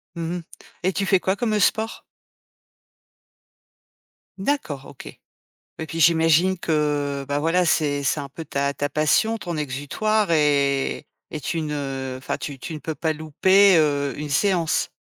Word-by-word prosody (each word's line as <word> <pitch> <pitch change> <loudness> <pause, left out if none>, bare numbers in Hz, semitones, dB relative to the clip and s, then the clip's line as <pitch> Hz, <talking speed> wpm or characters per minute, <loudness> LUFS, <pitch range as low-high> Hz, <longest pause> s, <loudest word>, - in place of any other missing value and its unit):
Mmh 170 +1 -3
mh. 170 - -8 0.4
Et 185 0 +1
tu 200 - -1
fais 190 -1 +3
quoi 190 +2 0
comme 215 -2 0
sport? 220 +3 0 2.3
D'accord, 190 - -2
OK. 135 - -12 0.7
Ouais, 160 - -4
puis 165 +1 -6
j'imagine 165 +3 +4
que, 145 -3 -1
bah, 145 0 -1
voilà, 170 +3 +2
c'est 145 -3 +1
c'est 145 +2 0
un 140 - -8
peu 160 +3 -9
ta 140 0 -1
ta 145 - -2
passion, 155 +10 +2
ton 175 -6 -5
exutoire 160 +9 -1
et 140 -2 +1 0.3
et 155 - -5
tu 165 - -2
ne 135 -3 -4
enfin, 130 - -4
tu 140 -2 -6
tu 160 - -7
ne 155 - -6
peux 160 0 -5
pas 160 -1 -1
louper, 185 +6 +4
heu, 145 -2 +1
une 150 0 -5
séance? 170 +2 +1
155 Hz, 155 wpm, -23 LUFS, 145-180 Hz, 2.3 s, j'imagine